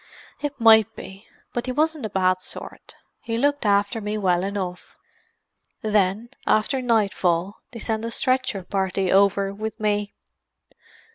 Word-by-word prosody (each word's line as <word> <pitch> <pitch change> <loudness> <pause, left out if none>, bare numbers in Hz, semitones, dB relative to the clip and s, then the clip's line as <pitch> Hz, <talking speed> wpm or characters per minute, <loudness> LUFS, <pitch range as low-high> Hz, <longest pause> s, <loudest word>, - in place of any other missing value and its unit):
"It 290 -2 -4
might 220 -2 +6
be. 195 +2 -11 0.3
But 240 +1 -3
he - - -1
wasn't 305 -2 0
a - - -12
bad 185 -1 +1
sort. - - -9 0.3
He 230 0 -2
looked 285 -1 +1
after 205 +3 +2
me 210 +1 -3
well 180 -3 +1
enough. 190 -2 -5 0.9
Then, 210 +1 +1 0.2
after 255 +5 +2
nightfall, 200 -5 +1
they 240 - -10
sent 220 -1 -2
a 230 - -2
stretcher 255 -4 0
party 190 0 -1
over 195 0 +3
with 215 +2 -5
me. 205 -1 -1
210 Hz, 140 wpm, -23 LUFS, 195-230 Hz, 0.9 s, might